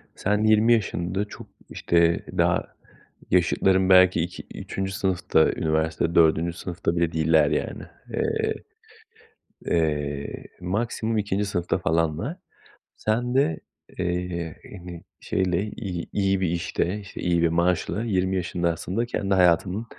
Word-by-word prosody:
Sen 105 Hz, +2 st, 0 dB
20 110 Hz, +2 st, +5 dB
yaşında, 95 Hz, -2 st, -1 dB
çok, -, -, -11 dB, 0.2 s
işte, 85 Hz, -1 st, +1 dB
daha -, -, +2 dB, 0.7 s
yaşıtların 95 Hz, +2 st, +3 dB
belki 95 Hz, -2 st, +6 dB
ik 85 Hz, +2 st, -5 dB, 0.2 s
3. 95 Hz, 0 st, -4 dB
sınıfta, 95 Hz, -4 st, +2 dB
üniversite 80 Hz, +1 st, -1 dB
4. 85 Hz, +1 st, +4 dB
sınıfta 90 Hz, -1 st, -3 dB
bile 85 Hz, -1 st, +1 dB
değiller, 80 Hz, 0 st, +3 dB
yani. -, -, -2 dB, 0.3 s
Eee, 440 Hz, 0 st, 0 dB, 1.1 s
eee, 75 Hz, -3 st, -1 dB, 0.2 s
maksimum 110 Hz, +4 st, -1 dB
2. 105 Hz, 0 st, 0 dB
sınıfta 90 Hz, -3 st, -1 dB
falanlar. 85 Hz, -, -1 dB, 0.6 s
Sen 120 Hz, +3 st, -1 dB
de, 80 Hz, -, +2 dB, 0.4 s
eee, 90 Hz, -2 st, -3 dB, 0.2 s
hani, 85 Hz, -1 st, -10 dB, 0.2 s
şeyle, 90 Hz, 0 st, 0 dB
iyi 90 Hz, -6 st, -5 dB
iyi 95 Hz, -1 st, +1 dB
bir 90 Hz, -, +1 dB
işte, 85 Hz, +3 st, -1 dB
işte, 100 Hz, -2 st, -9 dB
iyi 85 Hz, -1 st, +1 dB
bir 85 Hz, -, +4 dB
maaşla 85 Hz, +5 st, 0 dB
20 95 Hz, -3 st, 0 dB
yaşında 85 Hz, -1 st, 0 dB
aslında 95 Hz, +8 st, -3 dB
kendi 100 Hz, -4 st, -1 dB
hayatını, 90 Hz, +4 st, +3 dB
90 Hz, 125 wpm, -25 LUFS, 85-100 Hz, 1.1 s, belki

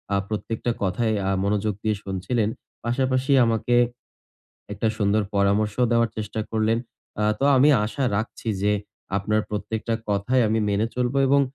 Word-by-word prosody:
আ -, -, +3 dB
প্রত্যেকটা 110 Hz, +2 st, -2 dB
কথায় 110 Hz, +4 st, 0 dB, 0.2 s
আ -, -, +2 dB
মনোযোগ 105 Hz, +1 st, 0 dB
দিয়ে 110 Hz, -1 st, +1 dB
শুনছিলেন। 105 Hz, +4 st, -1 dB, 0.4 s
পাশাপাশি 130 Hz, +2 st, 0 dB
আমাকে 115 Hz, +1 st, +1 dB, 1.0 s
১টা 115 Hz, -, 0 dB
সুন্দর 105 Hz, +1 st, +2 dB
পরামর্শ 100 Hz, +1 st, +2 dB, 0.2 s
দেওয়ার 115 Hz, -1 st, +3 dB
চেষ্টা 110 Hz, 0 st, -3 dB
করলেন। 110 Hz, +1 st, +1 dB, 0.4 s
আ -, -, +2 dB
তো 140 Hz, -, 0 dB
আমি 140 Hz, +4 st, +6 dB, 0.2 s
আশা 135 Hz, +6 st, -2 dB
রাখছি 110 Hz, +1 st, -4 dB
যে, 105 Hz, 0 st, +3 dB, 0.4 s
আপনার 105 Hz, +2 st, +1 dB
প্রত্যেকটা 110 Hz, +2 st, -2 dB, 0.2 s
কথায় 115 Hz, +6 st, +2 dB
আমি 110 Hz, +1 st, +1 dB
মেনে 100 Hz, +2 st, +1 dB
চলবো 125 Hz, +2 st, 0 dB
এবং 140 Hz, +1 st, +5 dB
110 Hz, 145 wpm, -24 LUFS, 105-120 Hz, 1.0 s, আমি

